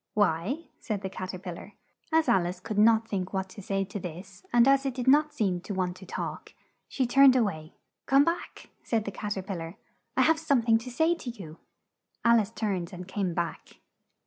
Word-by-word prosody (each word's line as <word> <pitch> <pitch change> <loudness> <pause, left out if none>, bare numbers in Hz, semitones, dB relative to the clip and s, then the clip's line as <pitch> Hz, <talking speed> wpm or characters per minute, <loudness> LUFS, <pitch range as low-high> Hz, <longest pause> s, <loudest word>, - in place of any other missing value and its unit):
"Why?" 205 - +1 0.2
said 205 -4 -4
the 190 - -4
Cat 185 -1 -5
er - - -5
pil 180 -1 -6
lar. - - -11 0.4
As 320 0 +3
Al 180 -2 +3
ice 180 +1 -5
could 210 +2 -3
not 225 +1 +5
think 190 -3 -3
what 190 0 -2
to 200 - -10
say 195 0 -1
to 200 +1 -6
this 180 - -9
and 240 +1 +5
as 275 0 +5
it 270 -3 -2
did 255 -1 -4
not 300 +3 +5
seem 185 -8 -1
to 200 - -6
want 180 -1 -1
to 190 - -13
talk, - - -5 0.3
she 260 - -1
turned 265 +2 +6
a 250 - +4
way. 155 -6 -4 0.3
"Come 275 +1 +5
back!" 335 +1 -4
said 225 -3 -1
the 200 - -3
Cat 205 +1 -4
er 190 - -3
pil 195 -1 -4
lar. 165 +2 -7 0.4
"I - - +5
have 320 -1 +3
some 280 -7 +2
thing 225 -1 +4
to 230 - -8
say 320 +7 +2
to 335 -7 -7
you!" 180 -9 -9 0.7
Al 235 0 +6
ice 210 -1 -1
turned 195 -6 -3
and 180 0 -8
came 190 -3 -2
back. 170 -1 -4
205 Hz, 225 wpm, -28 LUFS, 185-245 Hz, 0.7 s, turned